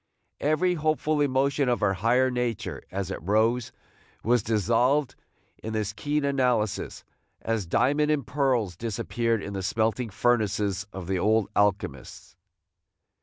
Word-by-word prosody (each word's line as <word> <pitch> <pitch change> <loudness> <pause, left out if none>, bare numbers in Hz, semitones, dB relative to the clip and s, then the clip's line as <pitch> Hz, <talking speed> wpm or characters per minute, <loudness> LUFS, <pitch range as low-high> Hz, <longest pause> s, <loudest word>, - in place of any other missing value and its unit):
Every 155 +5 +2
hopeful 155 -1 0
emotion 140 0 +1
of 120 - +1
her 100 -2 +2
higher 120 +6 +2
nature, 125 -3 -3
as 95 0 -4
it - - -5
rose, 110 +6 +1 0.5
was 120 +1 +3
dissolved 120 +6 +1 0.5
in 110 - -5
this 105 -2 -2
keen 145 +5 -1
analysis, 125 -6 0 0.4
as 110 -5 -2
diamond 145 - +2
and 150 -5 +1
pearls 125 -9 0
disappeared 115 +2 -1
in 100 - -6
the 95 - -3
smelting 110 +4 0
furnaces 105 -3 0
of 95 -2 -7
the 95 +1 -1
old 110 +2 +2
alchemists. 100 -5 -1
115 Hz, 130 wpm, -26 LUFS, 105-135 Hz, 0.5 s, was